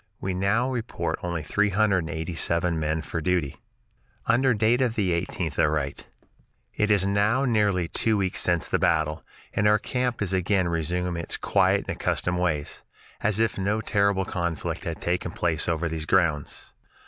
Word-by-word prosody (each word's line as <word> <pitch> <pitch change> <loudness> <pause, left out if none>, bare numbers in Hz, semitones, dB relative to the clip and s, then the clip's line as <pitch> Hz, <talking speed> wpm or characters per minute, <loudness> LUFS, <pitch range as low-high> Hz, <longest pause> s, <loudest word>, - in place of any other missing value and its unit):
We 95 - -2
now 100 +7 +1
report 120 -2 -3
only 85 -3 -3
three 105 +7 +1
hundred 100 -1 +2
and 80 -1 -5
eighty 80 +2 -4
seven 85 +1 0
men 80 0 -1
for 80 - -4
duty. 85 -3 -1 0.6
Under 125 +2 +3
date 115 +4 +2
of 120 -3 +1
the 100 -6 +1
18th 85 -2 -2
I - - +5
write: 75 -2 -3 0.7
"It 105 - 0
is 100 -2 +3
now 105 +7 +2
nearly 105 -7 +2
two 110 +5 +2
weeks 95 -2 0
since 85 -2 +2
the - - 0
battle, 80 -3 +1 0.3
and 105 - +2
our 105 0 +5
camp 125 0 -2
is 95 -1 -1
again 95 0 +1
resuming 85 +1 -1
its - - -2
quiet - - +2
and - - -3
accustomed 90 0 -1
ways, 80 -5 -2 0.4
as 105 0 +1
if 115 -3 +1
no 100 +3 0
terrible 100 -3 +1
conflict 85 -4 -3
had 80 -2 -4
taken 90 0 -1
place 80 -3 -1
over 85 0 0
these 80 -1 -4
grounds. 80 -6 0
90 Hz, 175 wpm, -25 LUFS, 85-105 Hz, 0.7 s, I